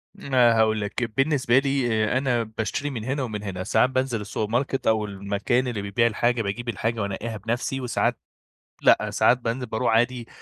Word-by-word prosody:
ما 125 -4 +3
هاقول 110 -1 +2
لك، 105 +4 -3
بالنسبة 135 -3 +3
لي 130 -5 0
أنا 125 -3 +1
باشتري 110 +6 -3
من 120 -6 -5
هنا 135 +3 -2
ومن 105 -4 -5
هنا، 95 -2 -4
ساعات 125 - +3
بانزل 130 -4 -1
السوبر 105 +1 -4
ماركت 130 +2 -1
أو 110 -1 +2
المكان 100 +5 -1
اللي 110 -5 -3
بيبيع 100 +4 +1
الحاجة، 120 +2 +1
باجيب 115 +4 -4
الحاجة 115 +1 -2
وأنقّيها 105 +3 -4
بنَفسي، 120 +5 -2
وساعات 125 - 0 0.6
لأ، - - +4
ساعات 125 - +4
بانزل 125 +1 -3
بارُوح 115 0 0
عادي 120 +1 +1
115 Hz, 175 wpm, -24 LUFS, 110-125 Hz, 0.6 s, لأ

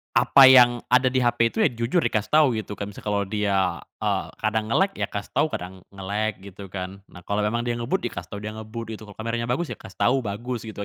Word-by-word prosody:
apa 135 - +7
yang 125 -2 +7
ada 125 +1 +5
di 130 -1 +1
HP 120 -1 +3
itu, - - -18
ya, - - +5
jujur 120 +9 0
dikasih 110 -1 0
tahu, 155 0 +5
gitu 105 -1 -8
kan. 100 - -4
Misal - - -11
kalau 100 -1 -1
dia, 100 -1 0 0.2
eee, - - -1
kadang 110 0 -1
nge-lag, 195 - +2
ya - - -3
kasih 100 0 -6
tahu. 150 - +2
Kadang 95 -5 -6
nge-lag, 100 +2 -3
gitu 100 0 -11
kan. 95 +1 -6
Nah, 90 0 -14
kalau 100 +1 -1
memang 115 +3 0
dia 120 - -1
ngebut, 125 +7 -1
ya 120 - -2
kasih 105 - -7
tahu - - -6
dia 105 - -4
ngebut, 110 +1 -7
gitu. 110 0 -9
Kalau 105 - -13
kameranya 115 +1 -3
bagus, 145 +7 -1
ya - - -7
kasih 95 - -13
tahu, 130 +3 +2
bagus, 115 +1 -5
gitu 100 -1 -6
110 Hz, 245 wpm, -24 LUFS, 100-120 Hz, 0.2 s, apa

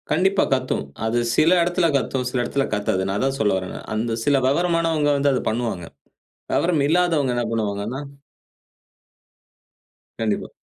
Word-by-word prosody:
கண்டிப்பா 190 +5 +2
கத்தும். 130 -1 -1 0.2
அது 115 +2 0 0.2
சில 155 +1 +4
இடத்துல 175 0 +2
கத்தும், 130 -1 -2
சில 125 - -2
இடத்துல 135 +3 -1
கத்தாது. 100 -2 0
நான் 95 +1 -1
அதான் 135 +1 0
சொல்ல 105 -2 +2
வரேன் 95 0 -5
நான். - - -9
அந்த 115 +1 -1
சில 145 -1 +4
வெவரமானவங்க 165 0 +1
வந்து 140 0 +2
அத 130 - 0
பண்ணுவாங்க. 110 -6 -2 0.7
விவரம் 170 -4 +2
இல்லாதவங்க 165 -6 +2
என்ன 120 - 0
பண்ணுவாங்கன்னா, 110 +3 -2 2.2
கண்டிப்பா. 110 -2 -1
135 Hz, 140 wpm, -22 LUFS, 115-160 Hz, 2.2 s, சில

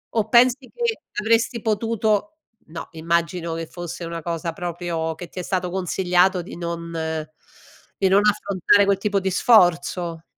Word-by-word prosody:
o 220 -2 +1
pensi 245 +2 +5
che 470 - -2 0.2
avresti 230 +2 +1
potuto 220 +6 0 0.3
no, 160 +1 -8
immagino 170 +1 -1
che 165 0 -5
fosse 175 0 -7
una 165 0 -5
cosa 170 0 -3
proprio 170 -1 -3
che 170 +2 -9
ti - - -19
è 180 - -4
stato 180 -1 -2
consigliato 180 0 +1
di 170 - -10
non 170 -1 -5 1.1
di 195 - +2
non 195 +2 +5
affrontare 200 -1 +3
quel 200 -1 +2
tipo 200 0 0
di 190 0 -1
sforzo? 175 -4 +3
180 Hz, 150 wpm, -22 LUFS, 170-210 Hz, 1.1 s, pensi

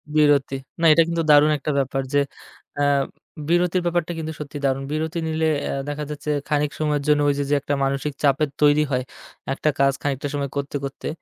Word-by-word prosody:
বিরতি, 145 -3 +3 0.3
না - - +3
এটা 165 - +5
কিন্তু 170 -1 -1
দারুণ 150 +1 +6
একটা 150 +2 -3
ব্যাপার 135 0 -1
যে, 145 - +4 0.6
অ্যা 145 - +2 0.6
বিরতির 175 +1 +2
ব্যাপারটা 175 -1 0
কিন্তু 160 0 -4
সত্যিই 145 -1 -6
দারুণ। 135 0 0
বিরতি 160 +2 -2
নিলে 160 0 0 0.2
অ্যা - - -2
দেখা 150 +1 -3
যাচ্ছে 150 0 -6 0.2
খানিক 150 -1 +1
সময়ের 150 -2 0
জন্য 150 -1 +4
ওই - - +3
যে, - - +1
যে 145 - +2
একটা 145 +1 -2
মানসিক 140 +2 -1
চাপের 145 +1 +3
তৈরি 150 0 +5
হয়, 125 -1 0 0.5
একটা 150 - 0
কাজ 140 0 +4
খানিকটা 140 0 -2
সময় 140 -1 -2
করতে, 140 0 -3
করতে। 135 0 -5
145 Hz, 195 wpm, -22 LUFS, 140-155 Hz, 0.6 s, দারুণ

